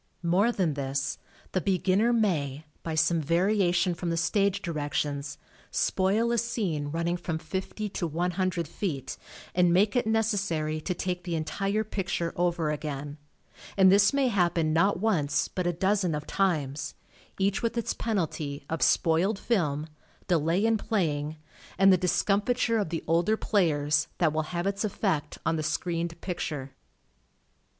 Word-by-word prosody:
More 185 +7 +3
than 180 -9 0
this, 135 -1 -2 0.3
the 185 - 0
beginner 195 +4 +2
may, 160 - 0 0.2
by 160 -1 -4
some 165 +1 +2
variation 180 +2 +2
from 170 +1 -4
the 165 - -1
stage 200 +3 +1
directions, 145 -3 -2 0.3
spoil 210 +5 +1
a 235 - +2
scene 185 -11 -2
running 170 +3 -1
from 170 -2 -3
fifty 190 +5 -4
to 175 -3 -2
one 170 +3 -1
hundred 180 -2 -1
feet 145 -6 -4 0.4
and 180 -1 +4
make 200 +6 +3
it 245 -3 +1
necessary 195 -9 0
to 180 +3 -2
take 180 0 -3
the 170 -2 -2
entire 195 +7 -1
picture 195 -5 -2
over 170 -3 0
again, 145 -1 -5 0.6
and 190 -1 +7
this 200 0 +5
may 275 -2 +2
happen 170 -6 +1
not 180 +4 +3
once 180 -9 +1
but 180 -2 -3
a - - +3
dozen 190 -1 +1
of 150 0 -5
times, 150 -7 -1 0.4
each 195 +1 +1
with 230 0 -1
its 235 - -1
penalty 155 -9 -2
of 165 - -2
spoiled 180 +5 +3
film, 155 -11 0 0.4
delay 170 +3 +2
in 225 -1 +2
playing 155 -8 -1 0.4
and 195 0 +6
the - - +7
discomfiture 210 +6 +1
of 200 - -1
the 165 - -3
older 170 +7 +2
players, 150 -8 +1
that 160 -4 +2
will 155 - +1
have 175 0 -2
its 200 +1 -1
effect 185 -7 -1
on 165 0 +1
the - - -1
screened 170 +1 -2
picture. 150 -7 -4
175 Hz, 155 wpm, -28 LUFS, 155-200 Hz, 0.6 s, and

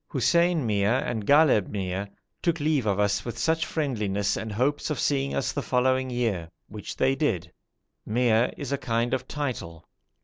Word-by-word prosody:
Hussein 165 +4 +2
Mia 105 +2 +2
and 110 -7 -3
Ghalib 145 -9 +5
Mia 95 0 -3 0.3
took 170 -2 0
leave 145 -6 +1
of 100 -1 +1
us 105 0 +1
with 120 +6 -3
much 160 0 +1
friendliness 105 - -1
and 110 - -4
hopes 135 +9 0
of 150 - -2
seeing 140 -1 0
us 135 - 0
the 145 - -3
following 130 0 +1
year, 110 -9 -1 0.2
which 105 0 -8
they 130 +1 +3
did. 95 - -1 0.5
Mia 115 +1 +2
is 140 -2 -5
a 140 - 0
kind 115 -1 -1
of 130 0 -2
title. 95 - -5
125 Hz, 170 wpm, -26 LUFS, 105-140 Hz, 0.5 s, Ghalib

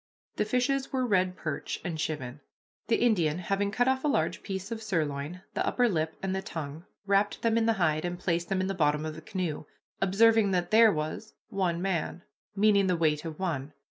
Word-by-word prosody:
The 210 - +1
fishes 255 +4 0
were 260 -2 0
red 185 -4 +2
perch 155 -3 -4
and 175 -3 -2
chivin. 145 -4 -4 0.5
The 230 - +3
Indian, 175 -11 +2
having 195 +3 -1
cut 245 +4 +1
off 265 0 +1
a - - +1
large 285 - 0
piece 195 +2 -5
of 225 -1 -4
sirloin, 165 -3 -2
the - - 0
upper 245 -1 +2
lip, 160 -6 -1
and 190 0 -1
the 190 - -1
tongue, 160 -1 -6 0.2
wrapped 200 +1 +1
them 230 -1 +3
in 230 0 +2
the 225 - +4
hide, 160 -6 +1
and 175 0 -3
placed 170 -1 -1
them 190 -1 +1
in - - 0
the 195 - -1
bottom 150 -3 +1
of 155 - -4
the 160 - -9
canoe, 180 -8 -3 0.4
observing 215 +2 +4
that 175 -1 0
there 220 0 +7
was 155 +7 -4
"one 180 -3 -1
man," 175 -2 -2 0.3
meaning 200 -1 +4
the 180 -2 +2
weight 155 -1 +1
of 160 -2 -5
one. 150 -6 -3
185 Hz, 205 wpm, -29 LUFS, 160-215 Hz, 0.5 s, there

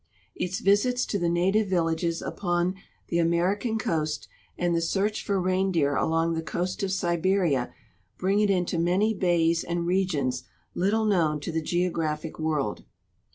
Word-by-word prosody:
Its 180 +1 -3
visits 245 +6 +3
to 200 - -2
the 170 -1 +1
native 190 +5 +2
villages 170 -2 0
upon 175 -1 -1 0.4
the 170 - +1
American 185 +7 +1
coast 155 -7 -2 0.3
and 175 -1 +1
the 165 - +1
search 200 +5 0
for 200 -2 0
reindeer 185 -6 +1
along 165 +2 +1
the 160 - -1
coast 180 +4 -3
of 195 -1 -1
Siberia 175 -6 +1 0.5
bring 195 +2 +1
it 210 -1 +3
into. 180 -3 +1
many 185 +6 +2
bays 170 -4 +2
and 170 0 -2
regions 155 -9 0 0.3
little 210 +5 +1
known 165 -7 +2
to 170 - -4
the 160 0 -1
geogra})hic 160 -2 -2
world. 150 -9 -1
175 Hz, 150 wpm, -26 LUFS, 165-195 Hz, 0.5 s, visits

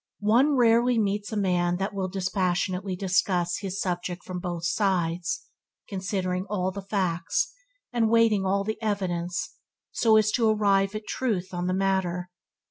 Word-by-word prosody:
One 240 +8 +4
rarely 240 0 +4
meets 205 0 0
a 215 - -2
man 180 -3 +1
that 195 +2 -2
will 195 -2 -2
dispassionately 185 0 -1
discuss 180 -1 +1
his 195 -1 -4
subject 175 -1 -3
from 180 -1 -5
both 175 -1 -4
sides, 180 0 0 0.4
considering 185 -1 -2
all 190 -2 -1
the 200 +1 -6
facts 190 - -1 0.4
and 230 -2 +2
weighing 225 -3 +4
all 195 +1 +1
the 220 +2 -4
evidence 180 -5 -2 0.3
so 220 -2 +4
as 215 -1 +3
to 225 -1 +2
arrive 200 -1 +2
at 215 0 -5
truth 200 -9 -2
on 175 0 -2
the 185 - 0
matter. 185 -2 0
195 Hz, 150 wpm, -26 LUFS, 180-210 Hz, 0.4 s, One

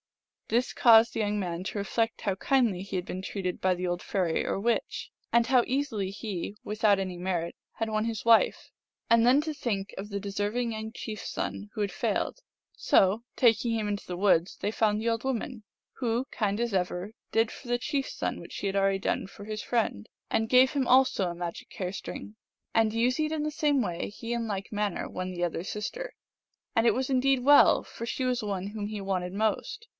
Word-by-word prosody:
This 240 +3 +1
caused 230 -1 +6
the - - -3
young 210 0 0
man 175 -2 -3
to 210 - -4
reflect 225 +3 -1
how 200 -3 0
kindly 230 -4 +2
he 195 0 -4
had 180 - -3
been 185 - -5
treated 190 -1 -4
by 185 0 +3
the 180 0 -3
old 175 0 -2
fairy 180 -5 0
or - - -1
witch, 235 +3 -1 0.2
and 235 -1 +4
how 250 -1 +5
easily 255 -8 -1
he, 200 -1 -5
without 210 -1 +2
any 185 -2 -3
merit, 175 -2 -2 0.2
had 225 - -2
won 215 0 0
his 225 -1 -3
wife, 230 -1 +4 0.4
and 230 0 +5
then 255 +4 +6
to 310 0 -3
think 210 -8 -3
of 200 +2 -6
the 200 -1 -3
deserving 205 +4 -2
young 220 0 -5
chief 220 -2 -6
s - - -6
son 205 - -4
who 215 - -3
had 200 -2 0
failed. 195 - -1 0.4
So, 200 +4 +3
taking 230 -1 +3
him 215 -2 -1
into 205 -1 -3
the 180 - -5
woods, 185 -2 +3
they 205 - -1
found 215 -1 +2
the 225 - -2
old 230 0 0
woman, 255 -3 -3 0.4
who, 240 0 0
kind 205 -1 -1
as 235 -2 -1
ever, 180 +2 -1 0.2
did 225 0 +3
for 255 - -11
the 245 - +2
chief 275 +2 -2
s - - -7
son - - -2
what - - -11
she - - -5
had 195 - -2
already 195 0 +2
done 190 - -1
for 200 +1 -11
his 215 0 -4
friend, 220 - -1 0.2
and 220 0 0
gave 255 +1 +6
him 280 -3 0
also 255 -8 +4
a 170 - -5
magic 170 -1 -6
hair 185 -1 -3
string. 210 +1 -7 0.4
And 225 -1 +3
using 250 +7 +1
it - - -7
in 310 -1 -1
the 305 - -1
same 290 -3 +2
way 175 -6 -3
he 230 +3 -5
in 235 -1 -2
like 200 -2 -4
manner 205 -3 -1
won 185 0 -4
the 175 -1 -1
other 170 0 -3
sis 210 +2 -4
ter; - - -6 0.6
and 225 - +3
it - - +4
was 260 +1 -1
indeed 265 0 +3
well, 290 +1 +7
for 230 - -7
she 255 +2 -2
was 250 -1 +1
the 210 - -4
one 195 -1 -2
whom 205 0 -4
he 210 0 -5
wanted 185 -2 -2
most. 220 - -1
215 Hz, 220 wpm, -28 LUFS, 195-240 Hz, 0.6 s, well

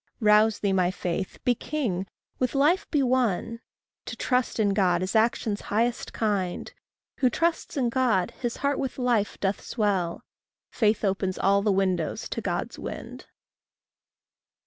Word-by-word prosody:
Rouse 215 -1 +5
thee, 200 -2 0
my 180 -2 +3
faith; 185 0 -3
be 245 - +3
king; 225 -9 -3 0.3
with 255 +1 0
life 300 +7 +3
be 290 -3 +2
one; 235 -3 0 0.5
To - - -5
trust 250 -2 0
in 210 -2 +3
God 185 -3 +2
is 185 - -3
action's 220 -2 +1
highest 235 +3 0
kind; 200 -5 -2 0.5
Who 255 - +4
trusts 330 +4 -1
in 250 -3 +2
God, 230 -7 +1
his 240 -2 -4
heart 280 0 +1
with 270 - -3
life 240 -5 0
doth 195 0 -1
swell; 195 -7 -1 0.5
Faith 215 -2 +1
opens 190 -1 -1
all 200 +1 +3
the 205 0 +2
windows 185 -4 0
to - - -3
God's - - -3
wind. - - -7
215 Hz, 145 wpm, -26 LUFS, 190-245 Hz, 0.5 s, Rouse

